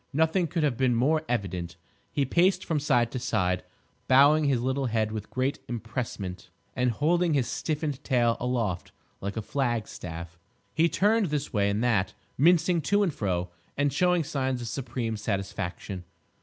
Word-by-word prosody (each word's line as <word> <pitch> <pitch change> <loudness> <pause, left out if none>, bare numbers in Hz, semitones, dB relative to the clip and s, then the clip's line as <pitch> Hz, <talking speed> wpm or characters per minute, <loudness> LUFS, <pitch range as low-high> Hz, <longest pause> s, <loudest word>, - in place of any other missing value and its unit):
Nothing 160 +4 +2
could 165 +1 -1
have 140 -6 +1
been 130 -2 +2
more 150 +7 +3
evident. 90 -7 -2 0.4
He 140 - +1
paced 180 +6 +2
from 160 -3 0
side 125 -5 +2
to 130 - -3
side, 90 -7 0 0.4
bowing 145 +4 +6
his 135 -4 +2
little 130 +2 0
head 110 -2 0
with 110 -1 -5
great 130 +2 -1
empressement 110 -6 -5 0.3
and 125 -1 +2
holding 165 +6 +2
his 130 -3 +2
stiffened 150 0 -2
tail 120 -3 +2
aloft 115 -7 -1 0.3
like 100 +1 -4
a 110 - -2
flag 120 -4 -1
staff. 85 -1 -8 0.3
He 165 +2 +3
turned 210 +2 +3
this 145 -3 -3
way 100 -2 +2
and 105 +3 0
that, 105 -5 +1 0.2
mincing 170 +3 +4
to 205 +5 +2
and 175 -6 0
fro, 90 -6 -2 0.3
and 145 0 +1
showing 180 -2 +3
signs 130 -3 -1
of 120 - -5
supreme 120 -2 -3
satisfaction. 95 -2 -4
125 Hz, 165 wpm, -27 LUFS, 105-150 Hz, 0.4 s, bowing